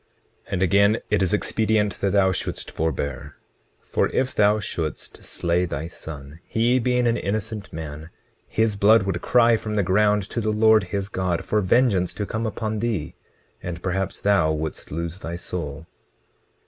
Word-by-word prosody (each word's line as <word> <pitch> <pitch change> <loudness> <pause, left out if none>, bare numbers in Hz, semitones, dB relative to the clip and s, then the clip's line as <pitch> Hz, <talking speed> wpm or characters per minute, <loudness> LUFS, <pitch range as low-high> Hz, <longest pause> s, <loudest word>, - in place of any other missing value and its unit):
20:18 - - -8
And 95 0 +1
again, 100 +4 +4
it 105 -1 +3
is 90 -2 +1
expedient 105 -1 +1
that 100 - +2
thou 95 -1 +3
shouldst 90 - -4
forbear; 70 -3 -3 0.5
for - - 0
if 130 0 -1
thou 105 +1 +3
shouldst 80 -7 -5
slay 85 +1 0
thy 80 -2 -4
son, 75 -3 -9
he 120 +3 +2
being 125 0 +1
an 115 0 +2
innocent 110 0 -3
man, 80 0 -7 0.4
his 110 -1 +1
blood 100 +1 +5
would 95 -3 -2
cry 120 -1 +4
from 110 -1 -4
the 100 - +2
ground 105 +2 +2
to 115 - -1
the 110 - -1
Lord 110 -1 +4
his 100 +2 -3
God, 90 -3 -2
for 105 - +1
vengeance 100 -3 +2
to 105 - -2
come 110 +2 -2
upon 110 0 -3
thee; 110 -9 -2 0.5
and 85 -1 -6
perhaps 95 0 -2
thou 100 -6 +3
wouldst 80 0 -4
lose 85 +3 -4
thy 85 -2 -5
soul. 80 -3 -5
100 Hz, 170 wpm, -23 LUFS, 85-110 Hz, 0.5 s, blood